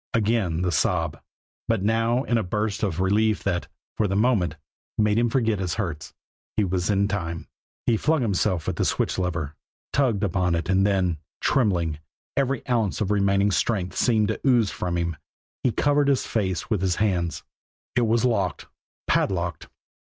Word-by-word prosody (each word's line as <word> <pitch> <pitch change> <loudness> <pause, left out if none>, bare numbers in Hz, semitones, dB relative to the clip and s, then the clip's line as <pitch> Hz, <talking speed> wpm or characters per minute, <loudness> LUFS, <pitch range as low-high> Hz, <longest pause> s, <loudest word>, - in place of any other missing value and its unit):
Again 105 -7 +1
the 90 - +1
sob 75 - 0 0.5
but 110 -4 +1
now 115 +4 +2
in 120 -3 +1
a - - -1
burst 105 +3 -2
of 90 -5 -1
relief 105 +3 +2
that, 90 -3 -1 0.3
for 105 - +2
the 95 - -1
moment, 100 -8 +2 0.4
made 105 0 +3
him 120 0 +2
forget 115 -4 +1
his 90 -3 -2
hurts. 85 -8 -4 0.5
He 105 - +4
was 90 -2 -1
in 100 0 +2
time! 85 -5 -3 0.4
He 115 - +3
flung 155 +3 +1
himself 95 -5 0
at - - -2
the - - +1
switch - - 0
lever, 85 -5 -2 0.4
tugged 120 -7 +2
upon 90 -2 +1
it 85 +2 -3
and 95 +1 +4
then, 90 -5 +1 0.2
trembling, 85 - +1 0.4
every 135 -2 0
ounce 115 -6 +1
of 105 -2 0
remaining 100 0 +3
strength 95 -2 0
seeming 110 -4 +3
to 110 - -2
ooze 120 -7 +3
from 85 -1 -2
him, 85 -2 -2 0.4
he 125 - +2
covered 145 +3 +2
his 140 -3 +2
face 95 -7 -1
with 105 -5 0
his 95 -2 +1
hands. 90 -6 0 0.5
It 120 -2 +3
was 115 +2 +2
locked 100 -7 0 0.4
padlocked. 90 -3 0
100 Hz, 170 wpm, -25 LUFS, 90-115 Hz, 0.5 s, He